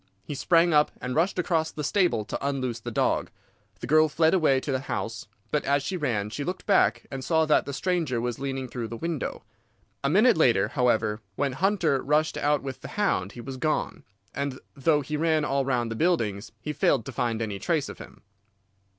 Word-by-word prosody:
He - - -6
sprang 165 +4 +3
up 150 0 +5
and 125 0 -4
rushed 170 +7 +1
across 165 -3 +1
the 150 - -6
stable 175 - +1
to - - -5
unloose 130 -4 -2
the 120 - -6
dog. 115 - 0 0.5
The - - -4
girl 155 +3 +4
fled 160 +1 +3
away 155 -7 +3
to 140 - -4
the 130 - 0
house, 115 -4 -4 0.2
but 150 - +1
as 140 0 +1
she 185 - -3
ran 115 - -1
she 145 - -4
looked 180 +5 -4
back - - +3
and 135 -1 -5
saw 160 +2 +2
that 155 - +2
the - - -3
stranger 165 -5 -1
was 120 0 -3
leaning 135 -1 -3
through 120 -2 -5
the 115 - -6
window. 165 +1 -4 0.6
A 140 - +2
minute 215 - +5
later, 120 -10 +3
however, 110 -3 +1
when 140 +3 0
Hunter 170 -2 +1
rushed 150 +3 +1
out 145 -1 +1
with 135 -2 -6
the - - -7
hound 105 - 0
he 120 - -8
was 130 +2 -7
gone, 155 +4 -1 0.3
and 140 -2 -3 0.2
though 150 +2 +2
he 150 +2 -3
ran 160 -1 +2
all 140 -1 0
round 120 -4 0
the - - -3
buildings 115 - 0
he 150 - -4
failed 115 - +2
to - - -6
find 120 -3 -1
any 105 -3 -3
trace 160 - 0
of - - -9
him." - - -13
140 Hz, 210 wpm, -26 LUFS, 125-160 Hz, 0.6 s, up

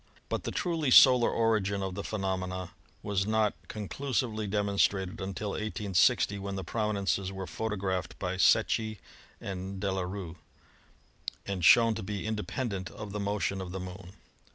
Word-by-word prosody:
But - - -2
the - - -2
truly 165 -6 -1
solar 125 -1 +8
origin 100 -3 +1
of 95 -1 -3
the 100 +2 -5
phenomena 95 -3 -3 0.3
was 100 -1 0
not 110 -1 +2
con 105 -2 -6
clusively 115 -5 -2
demonstrated 100 -1 +1
until 100 +2 -3
i860, 100 -2 +1
when 100 0 -4
the 95 - -4
prominences 100 -1 -1
were 95 -1 -5
photographed 95 -3 -3
by 90 -1 -3
Secchi 110 +2 +3 0.4
and 95 0 -5
De 100 0 -1
la 95 0 -1
Rue, 90 -2 -5 1.1
and 95 -3 -3
shown 115 +6 +7
to 110 - -5
be 100 +1 -4
independent 105 -2 -3
of 105 -1 -8
the 105 - -3
motion 100 -1 -1
of 90 -1 -6
the 95 - -4
Moon. 90 0 -8
100 Hz, 155 wpm, -30 LUFS, 95-110 Hz, 1.1 s, solar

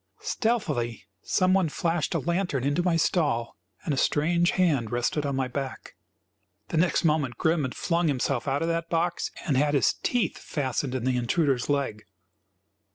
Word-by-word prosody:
Stealthily 155 - -1 0.2
some 185 0 +2
one 190 -4 +3
flashed 165 0 -1
a - - +2
lantern 170 -6 -1
into 145 +5 +1
my 175 -1 +1
stall 145 -8 +1 0.3
and 150 - 0
a - - -2
strange 170 +6 +2
hand 145 - +1
rested 120 +5 0
on 140 - -1
my 130 -1 0
back. 135 +1 -5 0.8
The 165 - -1
next 170 +2 +2
moment 150 -7 +1
Grim 160 0 +2
had 130 -3 -3
flung 170 -1 0
himself 135 -2 0
out 140 +3 0
of - - 0
that 165 0 -1
box 170 +1 0 0.2
and 145 - +1
had 145 +1 +2
his 130 -8 +3
teeth 245 -2 0
fastened 135 -2 -2
in 125 - -2
the 130 0 +1
intruder's 130 +1 +1
leg. 140 -7 -1
150 Hz, 170 wpm, -26 LUFS, 130-170 Hz, 0.8 s, one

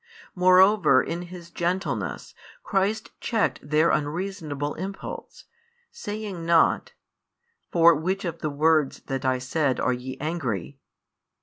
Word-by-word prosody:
Moreover 185 0 +5
in 170 +1 -4
His 175 -1 -10
gentleness 180 +3 -3 0.3
Christ 205 +2 -1
checked 225 -3 0
their 155 +3 +2
unreasonable 150 -2 -2
impulse, 195 +3 -7 0.5
saying 205 -4 -6
not: 165 -1 +3 0.8
"For 170 0 +6
which 185 +6 -2
of 170 -1 -4
the 155 - -2
words 155 0 +2
that 135 -1 -4
I 130 0 +2
said, 130 +1 -1
are 130 - +1
ye 125 +1 -6
angry?" 140 - -3
170 Hz, 115 wpm, -25 LUFS, 145-185 Hz, 0.8 s, For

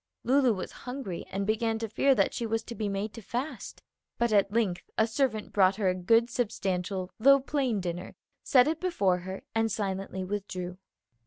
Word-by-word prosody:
Lulu 260 -1 +4
was 185 - -5 0.2
hungry 250 -10 -5
and 195 +1 -2
began 225 +1 0
to 225 0 -3
fear 270 +5 +3
that 195 -4 +2
she 235 - -2
was 225 0 -1
to 235 - -7
be 215 -3 -2
made 200 +2 -3
to 230 - -9
fast; 245 +2 -5 0.3
but 235 -2 +1
at 200 -1 +4
length 210 -5 -1
a 220 - +5
servant 225 -2 -1
brought 190 -1 +4
her 200 -3 +1
a - - +2
good, 225 +6 +3
substantial, 190 -5 -2
though 275 +4 +7
plain 265 -5 0
dinner, 175 -1 -5 0.3
set 255 -1 +5
it 315 +1 0
before 200 - +1
her, 190 +2 -7
and 225 0 +1
silently 195 -2 -3
withdrew. 185 -2 -4
215 Hz, 185 wpm, -29 LUFS, 190-235 Hz, 0.3 s, though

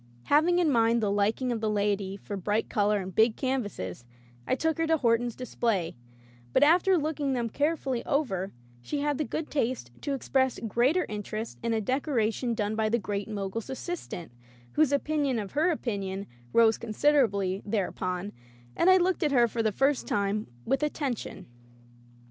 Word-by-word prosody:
Having 315 - +4
in 340 -4 +3
mind 230 -1 +3
the 210 -3 0
liking 215 +5 +1
of 230 -2 -2
the 220 - 0
laity 200 -2 0
for 205 - -6
bright 205 +3 -1
color 210 0 +2
and 185 0 -7
big 220 +3 +4
canvases 205 - -3 0.4
I - - +2
took 320 +3 -1
her 325 - +1
to 320 0 +3
Horton's 235 -2 +1
display, 225 -8 -1 0.6
but - - +5
after 355 +5 +5
looking 295 -3 -1
them 240 -2 -1
carefully 285 -3 -1
over 195 -10 0 0.3
she 285 - -3
had 290 -1 0
the - - +2
good 310 +2 -4
taste 245 - -1
to 280 - -1
ex 265 - -8
press 260 -2 +2
greater 260 - +2
interest 215 +1 -5
in 230 - -1
a 225 - +1
decoration 245 -1 0
done 210 0 -1
by 220 0 +1
the 235 - +2
Great 205 -2 -3
Mogul's 210 +2 -4
assistant, 265 - -5 0.4
whose 305 -2 +3
opinion 285 -2 +1
of 205 -3 -4
her 310 +5 +2
opinion 200 - -3 0.3
rose 225 - +4
considerably 215 -6 +2
thereupon, 190 -2 -2 0.4
and 360 - +4
I 375 - +8
looked 370 +1 +1
at 300 -4 +2
her 240 -3 +5
for 230 +1 -2
the 220 -1 +1
first 270 +6 +1
time 205 +1 0 0.2
with 270 - +1
at 300 0 -1
tention. 265 -7 -4
235 Hz, 175 wpm, -28 LUFS, 205-285 Hz, 0.6 s, I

